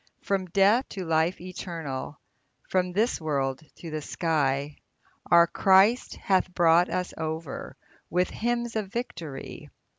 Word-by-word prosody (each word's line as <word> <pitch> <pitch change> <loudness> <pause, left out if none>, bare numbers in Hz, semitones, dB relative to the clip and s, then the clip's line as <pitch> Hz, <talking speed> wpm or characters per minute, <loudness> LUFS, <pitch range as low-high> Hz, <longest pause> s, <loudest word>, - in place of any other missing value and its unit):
From 195 -2 -1
death 200 +8 +3
to 190 -2 -5
life 165 +2 +1
eternal, 165 -6 -6 0.5
From 180 -1 +1
this 215 +2 0
world 135 -3 -1
to 165 - -9
the 155 0 -3
sky, 145 -3 -1 0.5
Our 170 0 +7
Christ 195 +7 +3
hath 185 -1 +1
brought 170 +1 +5
us 180 0 -2
over, 160 -1 -5 0.3
With 180 +2 +1
hymns 235 0 -2
of 215 -3 -1
victory. 165 - -6
175 Hz, 125 wpm, -27 LUFS, 155-195 Hz, 0.5 s, Our